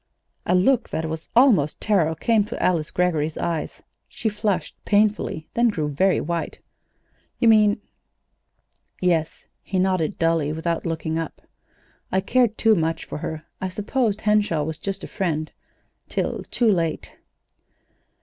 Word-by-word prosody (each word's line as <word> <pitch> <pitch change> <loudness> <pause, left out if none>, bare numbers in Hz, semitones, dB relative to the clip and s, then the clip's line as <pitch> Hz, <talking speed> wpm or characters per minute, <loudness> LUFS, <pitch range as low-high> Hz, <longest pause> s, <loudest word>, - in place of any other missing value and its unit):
A 180 - +3
look 235 +7 +3
that 160 +1 -2
was 160 +1 -6
almost 220 - +4
terror 175 -7 +2
came 220 +5 +2
to - - -6
Alice 165 -4 +1
Greggory's 160 -4 0
eyes. 165 -2 -3 0.3
She 220 - -2
flushed 205 -6 -1
painfully, 205 -6 +1
then 235 +1 +3
grew 155 -9 -1
very 185 +7 +2
white. 170 +1 -3 0.8
"You 235 - +2
mean 215 -2 +5 0.6
" - - -42
"Yes," 170 -3 0 0.2
he 190 - -3
nodded 185 -1 +1
dully, 165 -3 +1
without 165 +1 -2
looking 160 0 -2
up. 165 - -6 0.7
"I 190 - +2
cared 235 +2 +2
too 225 -1 +4
much 165 -4 -1
for - - -6
her. 160 -1 -5 0.2
I 185 - -1
supposed 215 +2 -1
Henshaw 210 -7 +2
was 160 +1 -4
just 195 0 -4
a - - -5
friend 155 -5 -2 0.6
till - - -2
too 235 -3 +3
late." 165 -4 -1
180 Hz, 145 wpm, -23 LUFS, 160-210 Hz, 0.8 s, mean